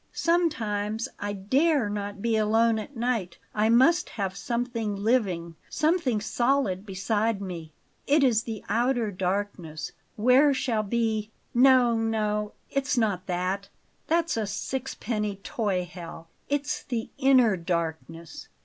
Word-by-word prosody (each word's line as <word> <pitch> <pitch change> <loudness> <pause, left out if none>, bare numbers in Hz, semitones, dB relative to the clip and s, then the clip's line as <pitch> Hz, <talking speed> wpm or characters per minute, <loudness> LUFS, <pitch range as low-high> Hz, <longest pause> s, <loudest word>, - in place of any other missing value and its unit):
Sometimes 225 -11 0
I 205 0 -3
DARE 260 - +2
not 205 -1 -4
be 230 -1 +2
alone 220 +1 +3
at 235 +5 -8
night. 225 -7 -1 0.2
I 215 +1 +2
must 320 +10 +4
have 195 -2 -2
something 230 +1 -2
living 195 -7 0
something 305 -8 +1
solid 220 -2 0
beside 205 +2 0
me. 175 -5 -6 0.4
It 290 +1 +4
is 235 -5 +4
the 225 -3 -6
outer 240 -2 +1
darkness, 180 -5 -3 0.2
where 260 +6 +5
shall 235 -4 0
be 220 0 -1 0.2
No, 250 -1 +5
no! 210 -2 -1 0.2
It's 275 0 0
not 200 -5 0
that; 185 +2 -2 0.4
that's 335 -4 +1
a 215 -2 -1
sixpenny 210 -1 -3
toy 195 -2 -2
hell; 165 -1 -10 0.2
it's 290 +1 -1
the 235 -4 -4
INNER 255 -6 +5
darkness. 165 -1 -4
220 Hz, 125 wpm, -27 LUFS, 195-250 Hz, 0.4 s, where